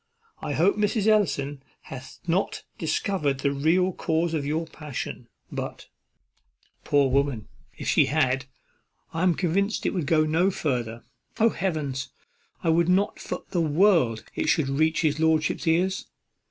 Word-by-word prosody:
I 145 Hz, -, -3 dB
hope 180 Hz, +8 st, +3 dB
Mrs. 210 Hz, 0 st, +1 dB
Ellison 145 Hz, -10 st, +2 dB, 0.2 s
hath 130 Hz, 0 st, -10 dB
not 175 Hz, +3 st, 0 dB, 0.2 s
discovered 150 Hz, -4 st, -1 dB
the 140 Hz, -, +1 dB
real 165 Hz, +7 st, +2 dB
cause 165 Hz, 0 st, 0 dB
of 145 Hz, -3 st, -1 dB
your 160 Hz, +3 st, -1 dB
passion; 150 Hz, -4 st, -6 dB, 0.2 s
but, -, -, -6 dB, 0.9 s
poor 140 Hz, -2 st, +3 dB
woman, 135 Hz, -5 st, 0 dB, 0.3 s
if -, -, -6 dB
she -, -, +4 dB
had, 130 Hz, -3 st, +1 dB, 0.7 s
I 165 Hz, -, -2 dB
am 180 Hz, -2 st, +3 dB
convinced 195 Hz, +4 st, 0 dB
it -, -, +1 dB
would 175 Hz, -7 st, -2 dB
go 155 Hz, 0 st, +4 dB
no 165 Hz, +5 st, +2 dB
farther. 120 Hz, -, -2 dB, 0.4 s
Oh, 225 Hz, +1 st, +5 dB
Heavens! 155 Hz, -9 st, -2 dB, 0.5 s
I -, -, +1 dB
would 170 Hz, +1 st, +3 dB
not 195 Hz, +3 st, +2 dB
for -, -, -5 dB
the 175 Hz, -, +1 dB
world 155 Hz, -, +3 dB
it -, -, -1 dB
should 145 Hz, -4 st, +2 dB
reach 155 Hz, +3 st, +2 dB
his 155 Hz, -2 st, +1 dB
lordship's 160 Hz, 0 st, +1 dB
ears. 180 Hz, +4 st, +1 dB
160 Hz, 150 wpm, -26 LUFS, 140-180 Hz, 0.9 s, Oh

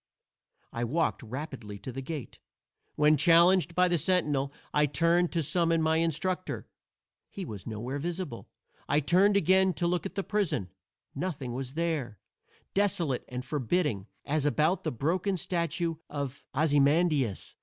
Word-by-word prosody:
I 120 Hz, -, -2 dB
walked 155 Hz, +9 st, 0 dB
rapidly 125 Hz, -4 st, -7 dB
to 130 Hz, -, -7 dB
the 135 Hz, +2 st, -5 dB
gate. 145 Hz, -1 st, -7 dB, 0.6 s
When 150 Hz, +1 st, +4 dB
challenged 170 Hz, +2 st, +5 dB
by 180 Hz, 0 st, +4 dB
the 175 Hz, -2 st, +1 dB
sentinel, 145 Hz, -5 st, +1 dB, 0.2 s
I 150 Hz, 0 st, +4 dB
turned 170 Hz, +5 st, +2 dB
to 165 Hz, -2 st, +1 dB
summon 165 Hz, +2 st, +2 dB
my 160 Hz, 0 st, +3 dB
instructor. 170 Hz, +3 st, -1 dB, 0.6 s
He 195 Hz, -, -6 dB
was 105 Hz, -, -8 dB
nowhere 120 Hz, +6 st, -4 dB
visible. 170 Hz, -5 st, -4 dB, 0.4 s
I 145 Hz, -, +4 dB
turned 185 Hz, +7 st, +4 dB
again 190 Hz, +1 st, +4 dB
to 170 Hz, -, -1 dB
look 175 Hz, +2 st, 0 dB
at 195 Hz, -, -15 dB
the 195 Hz, -, -1 dB
prison. 175 Hz, -, -1 dB, 0.4 s
Nothing 140 Hz, -6 st, -4 dB
was 130 Hz, +2 st, -5 dB
there: 155 Hz, -10 st, -2 dB, 0.6 s
desolate 185 Hz, -10 st, 0 dB
and 125 Hz, 0 st, -5 dB
forbidding, 135 Hz, -, -1 dB, 0.2 s
as 150 Hz, 0 st, +1 dB
about 155 Hz, +5 st, +1 dB
the -, -, -1 dB
broken 180 Hz, -, 0 dB
statue 170 Hz, -1 st, -1 dB
of 140 Hz, -2 st, -5 dB
Ozymandias. 145 Hz, -, +2 dB
155 Hz, 145 wpm, -29 LUFS, 135-175 Hz, 0.6 s, challenged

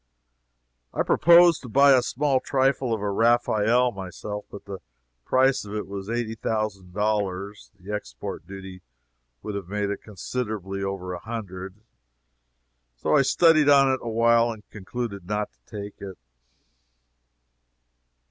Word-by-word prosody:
I -, -, +1 dB
proposed 170 Hz, 0 st, +6 dB
to 125 Hz, -, -9 dB
buy 140 Hz, +4 st, +6 dB
a 130 Hz, -2 st, +6 dB
small 135 Hz, +2 st, 0 dB
trifle 135 Hz, -1 st, +1 dB
of 110 Hz, -2 st, -1 dB
a 100 Hz, 0 st, -1 dB
Raphael, 115 Hz, +2 st, +3 dB
myself, 105 Hz, +1 st, -7 dB
but 100 Hz, -, -11 dB
the 100 Hz, -1 st, -7 dB, 0.5 s
price 130 Hz, +1 st, +3 dB
of 105 Hz, 0 st, -7 dB
it 105 Hz, -, -3 dB
was 100 Hz, +1 st, -7 dB
eighty 115 Hz, -1 st, -2 dB
thousand 105 Hz, -4 st, -3 dB
dollars, 100 Hz, -1 st, -2 dB
the 100 Hz, +3 st, -7 dB
export -, -, -6 dB
duty 95 Hz, -1 st, -9 dB, 0.6 s
would 105 Hz, -, -5 dB
have 100 Hz, -3 st, -5 dB
made 100 Hz, +1 st, -2 dB
it 100 Hz, -, -5 dB
considerably 105 Hz, -1 st, -5 dB
over 95 Hz, -2 st, -4 dB
a 90 Hz, -, -5 dB
hundred, 95 Hz, -4 st, -7 dB
and 105 Hz, -, -31 dB, 1.1 s
so -, -, 0 dB
I 145 Hz, -, +6 dB
studied 155 Hz, +1 st, +4 dB
on 140 Hz, -1 st, +6 dB
it 130 Hz, -, -2 dB
awhile 115 Hz, 0 st, +3 dB
and 110 Hz, -2 st, -11 dB
concluded 100 Hz, -2 st, -6 dB
not 105 Hz, +1 st, -2 dB
to -, -, -39 dB, 0.2 s
take 100 Hz, -, -11 dB
it. 95 Hz, -2 st, -8 dB
105 Hz, 145 wpm, -25 LUFS, 100-125 Hz, 1.1 s, proposed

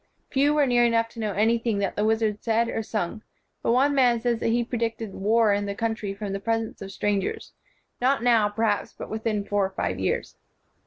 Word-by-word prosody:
Few 280 Hz, +2 st, +3 dB
were 295 Hz, -1 st, +4 dB
near 245 Hz, -2 st, +3 dB
enough 230 Hz, -1 st, +2 dB
to 230 Hz, -, -12 dB
know 215 Hz, -2 st, -1 dB
anything 225 Hz, +2 st, +1 dB
that 200 Hz, -1 st, -1 dB
the 210 Hz, -, 0 dB
wizard 220 Hz, -1 st, +1 dB
said 230 Hz, 0 st, +1 dB
or 225 Hz, -, -2 dB
sung; 215 Hz, -1 st, -3 dB, 0.4 s
but -, -, +1 dB
one 270 Hz, +4 st, +3 dB
man 250 Hz, -4 st, +4 dB
says 235 Hz, -1 st, 0 dB
that -, -, -1 dB
he 235 Hz, +1 st, +1 dB
predicted 230 Hz, -3 st, -3 dB
war 215 Hz, +1 st, +3 dB
in 205 Hz, 0 st, -1 dB
the 200 Hz, -, -3 dB
country 225 Hz, -2 st, -2 dB
from 200 Hz, -1 st, -5 dB
the 195 Hz, -, -2 dB
presence 225 Hz, +1 st, -2 dB
of 195 Hz, 0 st, -7 dB
strangers, 200 Hz, -1 st, -2 dB, 0.5 s
not 260 Hz, -1 st, +2 dB
now, 230 Hz, -4 st, +4 dB
perhaps, 210 Hz, -1 st, -1 dB
but -, -, -7 dB
within 220 Hz, -2 st, -2 dB
four 205 Hz, -1 st, +1 dB
or 190 Hz, -, 0 dB
five 190 Hz, -, -3 dB
years." -, -, -2 dB
225 Hz, 210 wpm, -25 LUFS, 205-235 Hz, 0.5 s, were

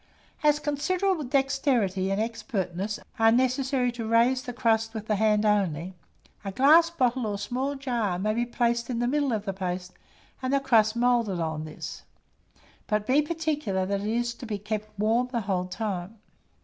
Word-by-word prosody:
As 300 Hz, -1 st, +4 dB
considerable 320 Hz, +5 st, 0 dB
dexterity 260 Hz, -8 st, +1 dB
and 195 Hz, +1 st, 0 dB
expertness 210 Hz, -3 st, -3 dB, 0.2 s
are 225 Hz, 0 st, +6 dB
necessary 255 Hz, +1 st, +1 dB
to 235 Hz, -2 st, -5 dB
raise 235 Hz, +3 st, +3 dB
the 255 Hz, -2 st, -6 dB
crust 225 Hz, -1 st, +1 dB
with 215 Hz, -1 st, -5 dB
the 215 Hz, -, +1 dB
hand 215 Hz, 0 st, +2 dB
only, 190 Hz, -4 st, +1 dB, 0.5 s
a 195 Hz, -, -4 dB
glass 310 Hz, -, +6 dB
bottle 255 Hz, -7 st, 0 dB
or 205 Hz, -1 st, -2 dB
small 255 Hz, +7 st, -2 dB
jar 240 Hz, -9 st, -1 dB
may 210 Hz, +4 st, 0 dB
be 235 Hz, +2 st, 0 dB
placed 235 Hz, 0 st, 0 dB
in 245 Hz, -, -2 dB
the 240 Hz, -, 0 dB
middle 285 Hz, 0 st, +1 dB
of 215 Hz, -2 st, -2 dB
the 195 Hz, -, -2 dB
paste, 180 Hz, -1 st, -4 dB, 0.5 s
and 260 Hz, 0 st, -1 dB
the 275 Hz, -, +3 dB
crust 225 Hz, -5 st, +3 dB
moulded 235 Hz, -6 st, +2 dB
on 160 Hz, -1 st, -2 dB
this; 155 Hz, -, -7 dB, 0.9 s
but 210 Hz, -1 st, 0 dB
be 270 Hz, +5 st, +4 dB
particular 300 Hz, -, -1 dB
that 200 Hz, +1 st, -1 dB
it 205 Hz, -, -3 dB
is 235 Hz, +2 st, 0 dB, 0.3 s
kept 215 Hz, -1 st, -2 dB
warm 225 Hz, +4 st, +2 dB
the 235 Hz, -2 st, -1 dB
whole 190 Hz, -3 st, -1 dB
time. 195 Hz, 0 st, -4 dB
230 Hz, 170 wpm, -27 LUFS, 205-260 Hz, 0.9 s, are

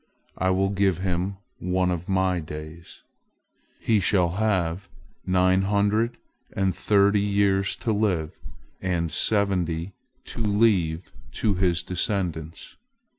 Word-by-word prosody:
I 95 Hz, -, +2 dB
will 95 Hz, +1 st, +2 dB
give 95 Hz, -2 st, +1 dB
him 95 Hz, +1 st, -2 dB, 0.2 s
one 90 Hz, 0 st, 0 dB
of 90 Hz, +1 st, -4 dB
My 95 Hz, -1 st, +1 dB
days. 80 Hz, +2 st, -9 dB, 0.8 s
He 110 Hz, -2 st, +2 dB
shall 90 Hz, -2 st, +2 dB
have 95 Hz, -2 st, -1 dB, 0.4 s
nine 95 Hz, 0 st, +3 dB
hundred 105 Hz, +4 st, +1 dB, 0.4 s
and 95 Hz, -1 st, 0 dB
thirty 100 Hz, 0 st, +3 dB
years 100 Hz, -1 st, +1 dB
to 115 Hz, -4 st, -2 dB
live, 95 Hz, -7 st, 0 dB, 0.5 s
and 85 Hz, -3 st, -1 dB
seventy 90 Hz, -2 st, 0 dB, 0.3 s
to 115 Hz, -, -7 dB
leave 100 Hz, -6 st, +1 dB, 0.2 s
to 105 Hz, -, 0 dB
his 90 Hz, -2 st, +1 dB
descendants." 85 Hz, -3 st, -3 dB
95 Hz, 115 wpm, -25 LUFS, 85-100 Hz, 0.8 s, nine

